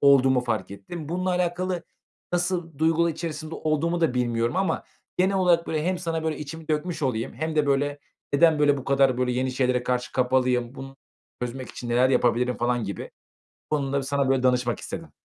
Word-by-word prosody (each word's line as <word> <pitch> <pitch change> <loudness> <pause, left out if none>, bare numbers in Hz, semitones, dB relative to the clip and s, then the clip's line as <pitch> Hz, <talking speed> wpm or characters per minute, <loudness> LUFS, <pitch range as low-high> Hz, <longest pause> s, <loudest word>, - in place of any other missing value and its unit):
olduğumu 135 -2 +5
fark 110 -6 -2
ettim. 145 - -8
Bununla 185 +2 -1
alakalı 180 0 -1 0.5
nasıl 175 -3 -1
duygular 165 +1 +3
içerisinde 160 0 -5
olduğumu 160 +3 0
da 160 -7 +2
bilmiyorum 120 +2 0
ama 190 0 0 0.3
genel 190 +2 +3
olarak, 175 -3 +3
böyle, 155 -1 -1
hem 185 +1 0
sana, 165 -2 -2
böyle, 160 -1 -1
içimi 155 +2 -8
dökmüş 155 +2 -1
olayım 125 -2 -1
hem 160 0 -3
de, 150 -1 +3
böyle, 145 +1 +1 0.4
neden, 160 +1 +5
böyle, 145 -1 +4
bu 135 - -6
kadar, 135 -2 +3
böyle, 125 -1 +1
yeni 130 +1 0
şeylere 125 -1 +1
karşı 125 0 -1
kapalıyım, 125 -1 +1
bunu 135 0 -9 0.5
çözmek 125 +1 -4
için 120 - -7
neler 125 +2 +4
yapabilirim 125 -1 +2
falan 120 -1 0
gibi. 100 -1 -5 0.6
Bu - - +4
konuda 140 -1 -1
sana, 140 0 0
böyle, 135 -1 +2
danışmak 125 -2 +2
istedim. - - -7
140 Hz, 180 wpm, -25 LUFS, 125-165 Hz, 0.6 s, olduğumu